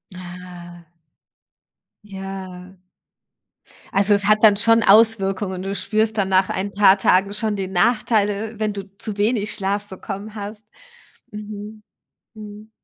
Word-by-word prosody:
Ah. 175 -1 -11 1.2
Ja. 190 -2 -9 1.1
Also, 200 +1 +3
es 200 -1 +1
hat 215 +1 +3
dann 210 -2 +7
schon 230 +1 +4
Auswirkungen. 195 -3 +3
Du 195 +1 -4
spürst 220 +1 0
dann 195 -2 0
nach 190 0 +2
ein 195 +2 -3
paar 200 -1 +5
Tagen 195 +1 +2
schon 210 0 -1
den 190 -1 -4
Nachteil, 210 +2 +1
wenn 215 -1 -1
du 200 -1 -6
zu 210 -1 -5
wenig 210 0 0
Schlaf 200 +1 -2
bekommen 200 +2 -8
hast. 210 +1 -8 0.6
Mhm, 210 0 -9 0.5
mhm. 215 0 -11
205 Hz, 125 wpm, -21 LUFS, 190-215 Hz, 1.2 s, dann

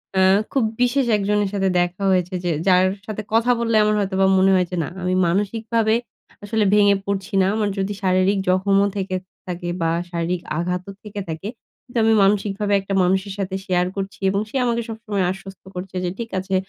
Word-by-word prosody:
অ্যা 190 - +4 0.3
খুব 270 - +1 0.2
বিশেষ 250 +2 +2
একজনের 205 0 0
সাথে 195 -1 +1
দেখা 175 +2 -1
হয়েছে 180 0 +1
যে, 175 - 0 0.2
যার 185 0 +5 0.2
সাথে 215 0 -4
কথা 230 +2 +3
বললে 230 -1 0
আমার 210 0 +2
হয়তোবা 195 -1 +1
মনে 190 +1 +4
হয় 180 -1 +3
যে, - - -2
না - - -5
আমি 180 0 0
মানসিকভাবে 220 +4 +1 0.5
আসলে 215 +1 0
ভেঙে 205 -1 +5
পরছি 200 0 -3
না। 185 - +3
আমার 215 -2 0
যদি 195 +1 -1
শারীরিক 185 +2 +2
জখমও 195 +2 +3
থেকে 190 -1 -2 0.3
থাকে 175 -1 -4
বা 165 0 +1 0.2
শারীরিক 170 +1 -2 0.2
আঘাতও 180 +2 -2
থেকে 210 -1 -7
থাকে, 160 +5 -5 0.4
কিন্তু 245 -1 -7
আমি 225 0 +4
মানসিকভাবে 205 +1 +1
একটা 195 +1 -5
মানুষের 190 +2 0
সাথে 190 -1 -3
শেয়ার 180 -2 +1
করছি 195 0 -5
এবং 195 +1 0
সে - - -12
আমাকে 235 -1 0
সবসময় 220 -3 -2
আশ্বস্ত 195 0 -10
করছে 180 +1 -7
যে, 180 - 0
ঠিক 230 -1 -4
আছে 190 +1 -2
195 Hz, 185 wpm, -21 LUFS, 185-210 Hz, 0.5 s, যার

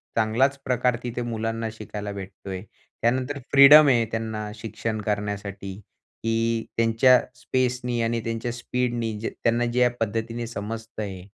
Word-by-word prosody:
चांगलाच 120 +5 +2
प्रकार 125 -1 +2
तिथे 120 0 -3
मुलांना 115 -1 -2
शिकायला 105 -1 -6
भेटतो 100 0 -9
आहे. 95 -1 -4 0.4
त्यानंतर 130 +4 0
फ्रीडम 145 +2 +9
आहे 120 -4 +4
त्यांना 110 -1 -3
शिक्षण 110 -1 -4
करण्यासाठी, 100 -2 -3 0.5
की 115 0 0
त्यांच्या 115 +3 +5 0.2
स्पेसनी 125 -2 0
आणि 115 0 0
त्यांच्या 115 +1 -3
स्पीडने 120 -1 -2 0.2
त्यांना 120 +1 0
ज्या 125 +1 +3
पद्धतीने 115 +2 -2
समजत 115 +1 -6
आहे, 95 -3 -6
115 Hz, 125 wpm, -25 LUFS, 110-120 Hz, 0.5 s, फ्रीडम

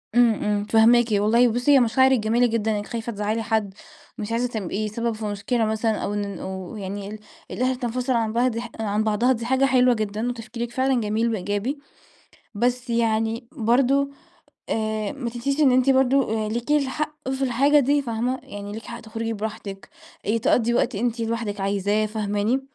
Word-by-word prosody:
إمم، 240 -2 +6
إمم، 210 -1 -1
فهماكِ 230 +2 +5
والله. 215 +4 +4
بصي، 245 +4 +1
هي 280 - +7
مشاعرك 260 +2 +4
جميلة 230 +3 +2
جدًا، 220 -1 0
أنِك 205 - -5
خايفة 235 0 -4
تزعلي 215 +1 -2
حد، 220 -3 -1 0.4
مش 215 -1 -5
عايزة 235 +2 +1
تبقي 215 -2 -3
سبب 230 +2 -2
في 215 0 -6
مشكلة 210 +3 -1
مثلًا، 220 +1 0
أو 205 - -2
إن 200 -1 -3
أو 190 +1 -6
يعني 200 0 -5
ال 215 +1 -8 0.3
الأهل 255 +1 0
تنفصل 250 +1 -2
عن 225 -2 0
بعض 240 0 +1 0.2
عن 215 -1 0
بعضها، 220 +4 +2
دي 230 -2 -1
حاجة 265 +2 +2
حلوة 255 -1 +4
جدًا، 215 +1 -2
وتفكيرك 235 0 -5
فعلًا 260 0 +1
جميل 220 +2 0
وإيجابي. 205 +8 -2 0.8
بس 245 +3 -1
يعني 225 0 0
برضه 275 +2 +2 0.6
آآ، 215 -1 -1
ما 250 -4 -4
تنسيش 275 +5 -2
إن 275 -4 +5
أنتِ 255 +1 +4
برضه 260 -5 +2
ليكي 240 +7 0
الحق 300 +1 -3
في 265 +1 -2
الحاجة 275 +4 +4
دي، 285 +2 +2
فاهمة؟ 245 +1 -2
يعني 205 0 -8
ليكي 220 +1 -8
حق 235 0 -7
تخرجي 225 0 -4
براحتك، 210 -2 -6 0.4
آآ، 215 +3 +2
تقضي 235 +1 +2
وقت 240 +1 +1
أنتِ 235 +3 -1
لوحدك 225 -3 -2
عايزاه، 200 +2 +1
فاهماني؟ 210 +3 -1
230 Hz, 175 wpm, -23 LUFS, 215-250 Hz, 0.8 s, هي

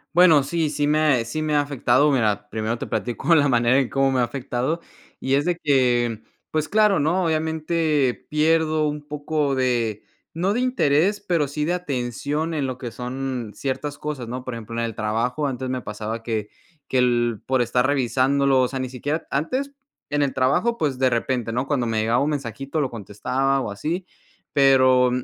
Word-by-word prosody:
Bueno, 165 -5 +6
sí, 160 +2 -1
sí 145 0 -1
me 150 +1 +2
ha 140 -7 +3
sí 155 +7 -3
me 155 -1 0
ha 145 - +4
afectado, 140 0 +2
mira, 105 -6 +1
primero 110 +1 -2
te - - -5
platico 130 +7 0
la 145 -3 +5
manera 120 0 +3
en 130 - 0
cómo 135 0 +2
me 130 - +1
ha - - +3
afectado 130 +5 -2 0.4
y 130 - -1
es 140 +1 +3
de 175 0 +1
que, 120 -7 +1 0.3
pues 155 -1 -1
claro, 210 -3 +4
¿no?, 170 +5 +1
obviamente 160 -3 0
pierdo 155 0 +2
un 150 0 -5
poco 150 -1 -1
de 120 -5 0 0.3
no 185 +4 +1
de 235 - 0
interés, 205 - +2
pero 175 -7 0
sí 150 +2 -2
de 175 - 0
atención 145 0 -2
en 145 -4 -1
lo 130 -1 -4
que 125 -2 -6
son 125 -2 -4
ciertas 140 +2 -3
cosas, 145 -6 -5
¿no?, 125 +2 -5
por 130 - -4
ejemplo, 115 0 -7
en 115 - 0
el 115 - -4
trabajo 115 +7 -1
antes 130 -1 -4
me 130 0 -2
pasaba 110 +1 -5
que 110 -2 -3 0.4
que 130 - +1
el 120 -3 +1
por 130 -2 +2
estar 125 +1 +1
revisándolo, 135 0 +2
o 125 - +2
sea, 135 +2 -5
ni 130 -1 -3
siquiera 145 +5 -3
antes 260 - -1 0.4
en 145 0 +1
el 140 -2 0
trabajo, 140 - +2
pues, 140 - -1
de 130 -1 +4
repente, 120 -1 -1
¿no?, 125 +3 -1
cuando 135 -4 0
me 110 -1 0
llegaba 115 +2 +2
un 145 - 0
mensajito 135 +1 -3
lo 140 -4 -1
contestaba 130 +6 -1
o 105 - -4
así, 165 - -3 0.5
pero 130 -2 +5
135 Hz, 195 wpm, -23 LUFS, 120-150 Hz, 0.5 s, Bueno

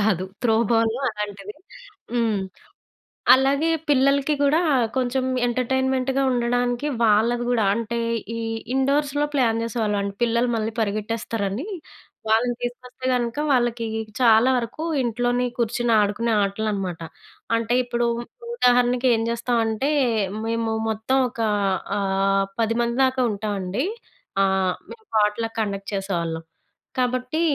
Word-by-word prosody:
కాదు! 195 -4 +1 0.2
Throw 225 -2 +4 0.2
ball 225 -1 +3 0.2
అలాంటివి. 210 -1 -6 0.6
హ్మ్. 230 -3 +1 1.0
అలాగే 275 +4 +3 0.2
పిల్లలకి 280 +1 +3
కూడా 305 +5 +3 0.4
కొంచెం 255 +1 0 0.2
ఎంటర్టైన్మెంట్‌గా 260 +2 0
ఉండడానికి 245 +2 0 0.2
వాళ్ళది 230 +3 +3
గూడా 230 -4 +2
అంటే, 230 0 -2 0.4
ఈ - - -3 0.4
ఇండోర్స్‌లొ 285 +2 +1
ప్లాన్ 230 -4 +2
జేసేవాళ్ళం 220 -3 -1
అండి. 200 0 -3
పిల్లలు 235 +1 +2
మళ్ళీ 220 +1 -2
పరిగెట్టేస్తారని. 215 - -2 0.6
వాళ్ళని 240 +2 +2
తీసుకొస్తే 250 +1 -6
గనుక 240 0 -1
వాళ్ళకి 240 -2 +1 0.3
చాలా 230 0 +5
వరకు 245 +6 -3 0.2
ఇంట్లోనే 245 +1 0
కూర్చొని 235 +1 0
ఆడుకునే 210 +3 0
ఆటలు 200 +2 -1
అనమాట. 190 -4 -3 0.6
అంటే 230 +1 0
ఇప్పుడు 240 -1 -1 0.5
ఉదాహరణకి 250 - +3
ఏం 225 - +1
జేస్తామంటే. 235 +1 0 0.5
మేము 230 0 -1 0.2
మొత్తం 220 +5 0
ఒక 240 - -14 0.6
ఆహ్, 195 0 +1 0.2
10 225 +1 +1
మంది 235 0 -1
దాకా 260 0 0
ఉంటామండి. 205 - -2 0.6
ఆహ్, 190 -1 +2 0.2
మేము 445 -2 -12
పొట్‌లాక్ 220 +2 +1
కండక్ట్ 200 -2 -3
చేసేవాళ్ళం. 170 -4 -2 0.6
కాబట్టి 255 +5 0
235 Hz, 115 wpm, -23 LUFS, 210-250 Hz, 1.0 s, చాలా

